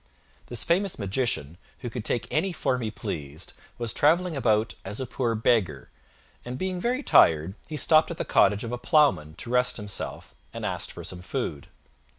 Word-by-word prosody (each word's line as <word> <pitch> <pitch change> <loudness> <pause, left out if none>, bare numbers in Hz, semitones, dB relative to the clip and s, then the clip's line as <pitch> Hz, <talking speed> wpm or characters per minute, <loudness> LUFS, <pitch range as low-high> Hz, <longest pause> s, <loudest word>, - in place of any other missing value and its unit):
This 120 - -2
famous 185 +3 +1
magician, 100 - -2 0.2
who 120 - -4
could 120 -3 -5
take 115 0 0
any 180 +5 +1
form 130 -6 0
he 110 - -2
pleased, 80 -8 -6 0.2
was 120 -2 -1
travelling 170 +3 +3
about 110 -4 +1
as 100 +2 -6
a 130 - -2
poor 120 -2 -1
beggar, 105 - +1 0.5
and 125 +1 -5
being 185 +2 -2
very 250 +6 0
tired 80 - +5
he 155 - -5
stopped 155 +1 +4
at 170 - -5
the - - -3
cottage 105 -1 +3
of 115 - -4
a 125 - -3
Ploughman 120 - +3
to 120 - -6
rest 125 0 +3
himself, 105 -2 -6 0.2
and - - -4
asked - - -2
for - - -9
some 90 -1 -8
food. 75 -5 -4
120 Hz, 180 wpm, -26 LUFS, 100-150 Hz, 0.5 s, tired